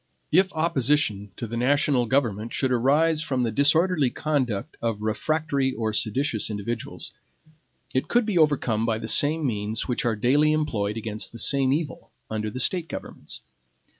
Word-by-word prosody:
If 190 Hz, +4 st, +4 dB
opposition 145 Hz, -10 st, +1 dB
to -, -, -4 dB
the 115 Hz, +1 st, -6 dB
national 130 Hz, 0 st, +2 dB
government 115 Hz, -4 st, 0 dB
should 130 Hz, -2 st, 0 dB
arise 150 Hz, +6 st, +2 dB
from 130 Hz, -6 st, -1 dB
the 115 Hz, -, 0 dB
disorderly 150 Hz, -, +3 dB
conduct 130 Hz, -8 st, -2 dB
of 115 Hz, -2 st, -2 dB
refractory 140 Hz, +3 st, 0 dB
or 110 Hz, -1 st, -2 dB
seditious 110 Hz, +1 st, -1 dB
individuals, 110 Hz, +2 st, -5 dB, 0.8 s
it 130 Hz, -, 0 dB
could 240 Hz, -1 st, +2 dB
be 210 Hz, -3 st, -2 dB
overcome 130 Hz, -8 st, +2 dB
by 115 Hz, -1 st, 0 dB
the 110 Hz, -, -6 dB
same 150 Hz, +5 st, +4 dB
means 110 Hz, -2 st, -2 dB
which 125 Hz, -, -1 dB
are 115 Hz, -2 st, +1 dB
daily 145 Hz, +8 st, +3 dB
employed 115 Hz, -9 st, -1 dB
against 110 Hz, -1 st, -4 dB
the -, -, -8 dB
same 135 Hz, +2 st, +2 dB
evil 145 Hz, -1 st, -3 dB, 0.2 s
under 110 Hz, 0 st, -2 dB
the 125 Hz, -, -6 dB
State 175 Hz, +3 st, 0 dB
governments. -, -, -8 dB
130 Hz, 160 wpm, -25 LUFS, 110-150 Hz, 0.8 s, If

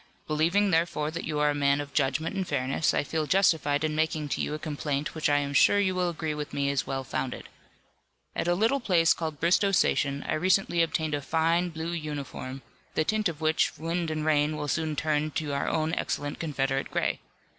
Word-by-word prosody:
Believing 170 Hz, +7 st, +2 dB
therefore 160 Hz, -2 st, +1 dB
that 165 Hz, -, -5 dB
you 155 Hz, -1 st, -2 dB
are 150 Hz, 0 st, +3 dB
a -, -, -1 dB
man 140 Hz, 0 st, +2 dB
of 145 Hz, -1 st, -6 dB
judgment 155 Hz, +6 st, 0 dB
and 190 Hz, -2 st, -2 dB
fairness 135 Hz, +4 st, +1 dB
I -, -, +1 dB
feel 155 Hz, +1 st, -2 dB
justified 160 Hz, -6 st, +2 dB
in 155 Hz, -1 st, 0 dB
making 155 Hz, -1 st, -1 dB
to -, -, -1 dB
you 150 Hz, -, -2 dB
a -, -, -3 dB
complaint 145 Hz, -1 st, -3 dB
which 155 Hz, -2 st, 0 dB
I 145 Hz, -, +4 dB
am 140 Hz, 0 st, -1 dB
sure 205 Hz, +7 st, +5 dB
you 190 Hz, -2 st, +2 dB
will 180 Hz, -1 st, 0 dB
agree 160 Hz, -2 st, -3 dB
with 150 Hz, -1 st, -5 dB
me 140 Hz, 0 st, +1 dB
is 140 Hz, -2 st, -1 dB
well 135 Hz, 0 st, -2 dB
founded. 130 Hz, 0 st, -4 dB, 0.9 s
At -, -, -1 dB
a 175 Hz, -, +3 dB
little 225 Hz, +8 st, +2 dB
place 175 Hz, -8 st, +3 dB
called 155 Hz, -3 st, -5 dB
Bristoe 185 Hz, +4 st, +3 dB
Station 140 Hz, -6 st, +1 dB
I -, -, 0 dB
recently 175 Hz, +1 st, +2 dB
obtained 160 Hz, -1 st, 0 dB
a 145 Hz, -, -1 dB
fine, 165 Hz, +4 st, +1 dB
blue 160 Hz, +1 st, -4 dB
uniform, 145 Hz, -4 st, -5 dB, 0.3 s
the 155 Hz, -, +2 dB
tint 215 Hz, +2 st, +1 dB
of 160 Hz, -2 st, -8 dB
which 155 Hz, 0 st, +1 dB
wind 165 Hz, +1 st, -2 dB
and 155 Hz, -1 st, -2 dB
rain 155 Hz, 0 st, +2 dB
will 150 Hz, 0 st, -3 dB
soon 155 Hz, +1 st, -1 dB
turn 155 Hz, 0 st, 0 dB
to 150 Hz, -3 st, -2 dB
our 140 Hz, -, -1 dB
own 160 Hz, 0 st, 0 dB
excellent 145 Hz, -3 st, -2 dB
Confederate 135 Hz, -4 st, -1 dB
gray. -, -, -1 dB
155 Hz, 210 wpm, -28 LUFS, 145-170 Hz, 0.9 s, sure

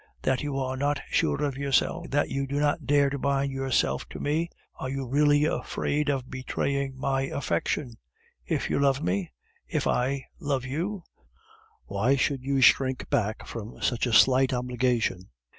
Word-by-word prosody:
That 130 Hz, -1 st, +1 dB
you 145 Hz, -2 st, -3 dB
are 130 Hz, -1 st, -1 dB
not 145 Hz, +2 st, 0 dB
sure 150 Hz, -, +1 dB
of 140 Hz, -2 st, -2 dB
yourself, 140 Hz, +5 st, +1 dB
that 145 Hz, +1 st, +1 dB
you 135 Hz, 0 st, -1 dB
do 140 Hz, +2 st, -1 dB
not 145 Hz, -2 st, 0 dB
dare 140 Hz, 0 st, +4 dB
to 140 Hz, -, -3 dB
bind 140 Hz, 0 st, 0 dB
yourself 130 Hz, -, 0 dB
to -, -, -8 dB
me. 160 Hz, +4 st, 0 dB, 0.3 s
Are 130 Hz, -, -3 dB
you 135 Hz, 0 st, -3 dB
really 145 Hz, +3 st, +3 dB
afraid 150 Hz, -1 st, -1 dB
of 135 Hz, -3 st, -1 dB
betraying 135 Hz, +1 st, -2 dB
my 135 Hz, 0 st, 0 dB
affection? 120 Hz, -, -2 dB, 0.5 s
If -, -, -1 dB
you -, -, +1 dB
love 135 Hz, -1 st, +2 dB
me, 90 Hz, +1 st, -1 dB, 0.4 s
if -, -, -1 dB
I 130 Hz, +2 st, 0 dB
love 140 Hz, -6 st, -1 dB
you, 170 Hz, +8 st, -3 dB, 0.8 s
why 110 Hz, +7 st, +1 dB
should 135 Hz, 0 st, 0 dB
you 135 Hz, 0 st, 0 dB
shrink 130 Hz, 0 st, +4 dB
back 110 Hz, -1 st, 0 dB
from 115 Hz, 0 st, -8 dB
such 125 Hz, 0 st, +1 dB
a -, -, -1 dB
slight 130 Hz, +2 st, +5 dB
obligation? 125 Hz, -6 st, 0 dB
135 Hz, 165 wpm, -27 LUFS, 125-140 Hz, 0.8 s, slight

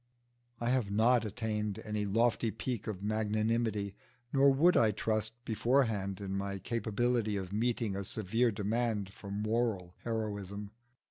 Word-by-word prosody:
I 120 Hz, +1 st, 0 dB
have 125 Hz, -6 st, +1 dB
not 115 Hz, +3 st, +4 dB
attained 105 Hz, -1 st, -2 dB
any 105 Hz, -1 st, -1 dB
lofty 115 Hz, +2 st, +2 dB
peak 115 Hz, 0 st, -4 dB
of 100 Hz, -3 st, -4 dB
magnanimity, 110 Hz, -1 st, 0 dB, 0.4 s
nor 140 Hz, 0 st, +6 dB
would 165 Hz, +7 st, +5 dB
I 110 Hz, -, +5 dB
trust 110 Hz, +1 st, 0 dB
beforehand 110 Hz, -5 st, +1 dB
in 95 Hz, -1 st, -4 dB
my 100 Hz, 0 st, -2 dB
capability 115 Hz, +1 st, 0 dB
of 95 Hz, 0 st, -5 dB
meeting 115 Hz, -2 st, 0 dB
a 100 Hz, -, -2 dB
severe 115 Hz, +4 st, +1 dB
demand 105 Hz, -1 st, -1 dB
for 100 Hz, -, -10 dB
moral 105 Hz, -3 st, -1 dB
heroism. 105 Hz, -3 st, -3 dB
110 Hz, 135 wpm, -32 LUFS, 100-115 Hz, 0.4 s, nor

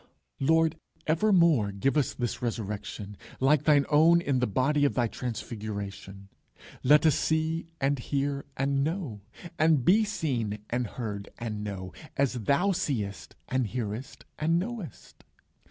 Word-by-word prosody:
Lord, 160 Hz, +3 st, +3 dB, 0.3 s
evermore 165 Hz, -, +3 dB
give 100 Hz, +9 st, 0 dB
us 150 Hz, -3 st, +1 dB
this 120 Hz, -3 st, -3 dB
Resurrection, 105 Hz, -3 st, -4 dB, 0.2 s
like 140 Hz, +2 st, +3 dB
thine 145 Hz, -3 st, +5 dB
own 160 Hz, +3 st, +6 dB
in 140 Hz, -6 st, 0 dB
the 125 Hz, -, +1 dB
body 140 Hz, +7 st, +1 dB
of 145 Hz, -, +2 dB
thy 120 Hz, -, +2 dB
Transfiguration. 105 Hz, -4 st, -6 dB, 0.5 s
Let 150 Hz, +4 st, +5 dB
us 155 Hz, -, +6 dB
see 160 Hz, +2 st, 0 dB
and 135 Hz, 0 st, +1 dB
hear, 140 Hz, +2 st, -2 dB
and 135 Hz, 0 st, +1 dB
know, 155 Hz, -, -3 dB, 0.4 s
and 155 Hz, -5 st, +4 dB
be 210 Hz, +5 st, +5 dB
seen, 130 Hz, -, -2 dB
and 120 Hz, 0 st, 0 dB
heard, 105 Hz, -4 st, -5 dB
and 110 Hz, -3 st, -4 dB
known, 95 Hz, -3 st, -5 dB, 0.3 s
as 140 Hz, -2 st, +2 dB
thou 140 Hz, -, +2 dB
seest, 120 Hz, -, -3 dB, 0.3 s
hearest, 115 Hz, +1 st, -5 dB
and 165 Hz, +2 st, +2 dB
knowest. 200 Hz, -, -6 dB
135 Hz, 135 wpm, -28 LUFS, 110-155 Hz, 0.5 s, own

